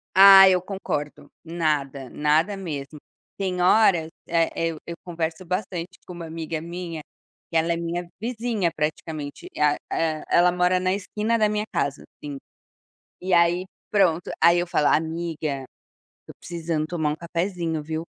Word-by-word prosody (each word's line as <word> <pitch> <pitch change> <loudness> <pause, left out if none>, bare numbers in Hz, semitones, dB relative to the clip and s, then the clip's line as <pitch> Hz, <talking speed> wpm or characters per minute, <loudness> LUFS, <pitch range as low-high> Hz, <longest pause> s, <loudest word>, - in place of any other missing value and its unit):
Ah, 195 0 +10
eu 180 -1 +3
concordo. 150 -6 -5
Nada, 150 -6 -2
nada 155 +7 +1
mesmo. 150 -5 -6 0.4
Tem 185 -2 -2
horas, 180 -4 +4 0.2
eh, 165 -1 +2 0.2
eu 160 - -6
eu 170 - -6
converso 170 0 -4
bastante 180 -1 -4
com 180 - -9
uma 170 -1 -7
amiga 160 0 -4
minha, 170 -1 -6 0.5
que 165 - -9
ela 165 +1 +2
é - - -2
minha 170 +1 -3
vizinha 225 -5 -1
praticamente, 150 -1 -4
a 150 -1 +3 0.2
e 160 -1 -1
ela 175 +1 +5
mora 180 +1 +2
na 185 0 +1
esquina 210 +3 -1
da 215 -1 +3
minha 210 0 -1
casa, 140 0 -1 0.2
assim. 145 -2 -5 0.8
E 185 +1 -3
aí 170 +1 +3 0.3
pronto, 180 -5 +2
aí 170 +1 +6
eu 175 - -2
falo: 160 -4 +1
"Amiga, 160 -3 -1
eu - - -10 0.6
tô - - -10
precisando 165 -2 -3
tomar 155 -2 -1
um - - -2
cafezinho, 170 -1 -2
viu. 160 +1 -4
170 Hz, 155 wpm, -24 LUFS, 155-185 Hz, 0.8 s, Ah